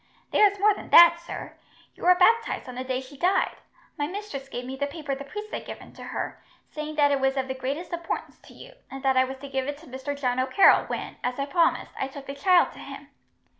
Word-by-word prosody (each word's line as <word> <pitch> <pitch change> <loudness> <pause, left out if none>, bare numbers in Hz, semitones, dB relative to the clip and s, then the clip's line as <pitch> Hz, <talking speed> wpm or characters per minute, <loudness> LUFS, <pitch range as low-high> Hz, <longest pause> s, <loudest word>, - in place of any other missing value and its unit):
"There 415 -2 +5
is 405 - -11
more 415 +1 +4
than - - -10
that, 340 0 +8
sir. 340 - -8 0.4
You - - -19
were 360 0 +7
baptized 455 +2 +2
on 255 - -7
the 255 +1 -5
day 260 0 -2
she 265 +2 -13
died. 365 +6 +1 0.4
My 290 - 0
mistress 340 -8 -7
gave 245 -1 -5
me 260 +1 -5
the 285 +1 -2
paper 285 -1 -5
the 275 +1 -5
priest 420 +9 -8
had - - -4
given - - -9
to - - -10
her, - - -5 0.3
saying 305 0 -5
that 290 -1 +4
it 280 - +2
was 270 0 +1
of 265 -1 -1
the 260 - -2
greatest 275 +7 -4
importance 340 -1 -4
to - - -17
you, - - -13 0.2
and 270 0 -8
that 265 -1 +3
I 260 0 +4
was 265 +1 -7
to 280 +1 -9
give 265 -1 -2
it 290 0 -4
to 320 - -16
Mr. 270 +2 -6
John 250 -2 0
O'Carroll 260 +9 +5
when, - - -5
as 250 0 -2
I 275 - -1
promised, 330 +3 +1
I 270 - -1
took 275 0 -10
the 275 - -6
child 350 +5 +4
to - - -14
him." - - -10
280 Hz, 250 wpm, -26 LUFS, 265-345 Hz, 0.4 s, that